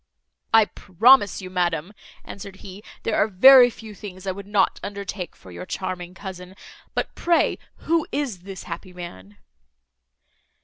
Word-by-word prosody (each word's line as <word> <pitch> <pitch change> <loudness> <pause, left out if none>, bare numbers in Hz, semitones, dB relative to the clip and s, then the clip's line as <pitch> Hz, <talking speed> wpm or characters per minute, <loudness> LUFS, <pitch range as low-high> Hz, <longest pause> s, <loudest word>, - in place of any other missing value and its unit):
"I 225 -1 +6
promise 205 +1 +3
you, 185 - -8
madam," 175 0 -1 0.3
answered 200 -1 -9
he, 195 +1 -9 0.2
"there 225 - 0
are - - +3
very 245 +5 +8
few 220 -2 -11
things 190 -2 -10
I 190 - -1
would 200 +1 -9
not 205 -2 +1
undertake 200 -3 -6
for 95 - -15
your 90 +1 -8
charming 180 -1 -5
cousin; 190 -1 -9 0.4
but - - -2
pray, 340 -1 +1 0.3
who 330 -1 +1
is 270 -10 -2
this 190 +1 -9
happy 180 +1 -8
man?" 105 - -10
190 Hz, 145 wpm, -23 LUFS, 180-210 Hz, 0.4 s, very